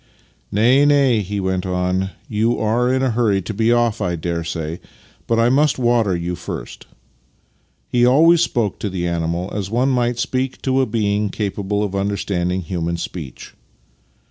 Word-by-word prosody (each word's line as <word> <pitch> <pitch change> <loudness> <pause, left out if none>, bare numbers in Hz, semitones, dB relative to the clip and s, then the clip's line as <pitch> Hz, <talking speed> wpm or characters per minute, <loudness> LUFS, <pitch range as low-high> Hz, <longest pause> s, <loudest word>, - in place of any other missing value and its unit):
" - - -38
Nay, 120 +7 +4
nay," 140 -5 +4
he 100 +1 -4
went 95 -1 -1
on. 90 +1 -1
" - - -35
You 115 +2 0
are 120 +3 +1
in 130 0 +1
a 130 - +1
hurry 110 -4 +2
to 110 - -5
be 110 +3 +2
off, 120 -2 +1
I 90 -3 0
daresay, 85 -1 -4 0.5
but 115 - +1
I 115 +1 +4
must 145 +4 +3
water 120 -6 +2
you 85 +1 -3
first," 90 - -7 1.0
(he 120 -1 +1
always 160 +7 +5
spoke 115 - 0
to 105 - -2
the 90 -2 -3
animal 85 +2 -2
as 100 -2 -3
one 125 +5 +1
might 120 -2 +1
speak 130 +1 -2
to 135 0 +2
a 130 - 0
being 105 -2 0
capable 100 0 -2
of 100 -2 -3
understanding 95 -2 -1
human 85 0 -3
speech). 80 -6 -7
105 Hz, 170 wpm, -20 LUFS, 90-120 Hz, 1.0 s, always